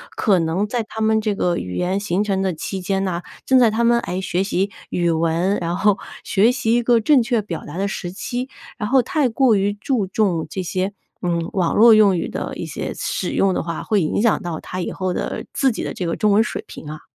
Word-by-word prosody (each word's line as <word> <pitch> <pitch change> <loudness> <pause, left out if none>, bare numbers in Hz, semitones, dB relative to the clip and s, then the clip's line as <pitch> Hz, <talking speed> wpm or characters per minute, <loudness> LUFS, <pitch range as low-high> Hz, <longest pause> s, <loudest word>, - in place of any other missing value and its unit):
可 200 -5 +3
能 170 +5 0
在 235 +1 -1
他 220 - -7
们 220 0 +2
这 210 -2 -1
个 175 -2 0
语 90 0 -5
言 185 +2 0
形 200 -1 0
成 195 -2 0
的 190 -1 +1
期 190 +4 -5
间 195 +1 -1
呐， 180 -3 -2 0.2
正 260 -1 +5
在 240 -2 +6
他 220 +2 0
们， 235 0 +4
诶， 185 -5 -3
学 185 -1 -1
习 195 0 -1 0.2
语 175 -1 +1
文， 165 +4 +1
然 170 +1 -2
后 205 -1 +3 0.2
学 210 +5 +3
习 250 -3 0
一 240 - +3
个 235 -1 +3
正 270 +4 +4
确 235 0 +1
表 170 -5 -5
达 150 - -7
的 200 +1 0
时 175 -3 -5
期， 250 +6 -4 0.3
然 210 - -2
后 265 -1 +4
太 285 0 +1
过 245 +1 +3
于 200 +1 +1
注 205 0 -1
重 185 -5 0
这 190 - -4
些， 185 +2 -2 0.3
嗯， 170 -2 -1
网 180 -3 +1
络 230 +1 +8
用 205 -4 +5
语 - - -2
的 - - -4
一 - - -5
些 - - -5
使 - - -2
用 195 -1 +2
的 - - -1
话， 165 0 -4
会 210 -3 +1
影 160 - 0
响 230 -1 +2
到 170 -2 -4
他 185 - -6
以 - - -3
后 185 -1 -2
的 - - -4
自 270 -2 +2
己 225 - -4
的 - - -4
这 180 - -4
个 165 - -1
中 210 -1 +2
文 215 +3 +5
水 - - -5
平 150 - -9
啊？ 155 0 -7
200 Hz, 265 characters per minute, -21 LUFS, 180-225 Hz, 0.3 s, 络